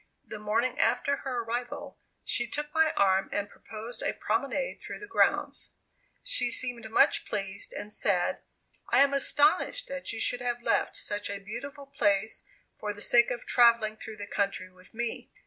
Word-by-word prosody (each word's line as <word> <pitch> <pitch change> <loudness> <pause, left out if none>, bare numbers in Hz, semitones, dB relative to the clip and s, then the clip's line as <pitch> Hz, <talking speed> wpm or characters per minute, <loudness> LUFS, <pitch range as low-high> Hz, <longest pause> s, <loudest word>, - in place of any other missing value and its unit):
The 215 - -7
morning 225 +4 0
after 280 0 +2
her 250 -4 -3
arrival, 240 +2 -5 0.3
she 240 - 0
took 295 +3 -4
my 320 -1 +4
arm 195 -1 +3
and 205 0 -1
proposed 220 +2 -7
a - - 0
promenade 275 - -2
through - - -7
the 415 - -9
grounds. 400 - +1 0.5
She - - +1
seemed 240 -2 -2
much 225 - +4
pleased, 195 0 -4
and 210 0 -5
said, 180 -3 +1 0.5
"I - - +5
am 280 0 +4
astonished 305 - +2
that - - -3
you - - -5
should 245 - +2
have 240 -1 -2
left - - +1
such 205 0 -3
a 200 - -3
beautiful 245 +8 -7
place 220 -6 0 0.4
for 210 -1 -3
the 205 - -12
sake 240 0 +5
of 245 -1 -4
travelling 235 -3 +4
through 220 0 -9
the 205 - -6
country 195 -2 -2
with 185 0 -18
me." 235 0 -3
235 Hz, 170 wpm, -29 LUFS, 205-275 Hz, 0.5 s, I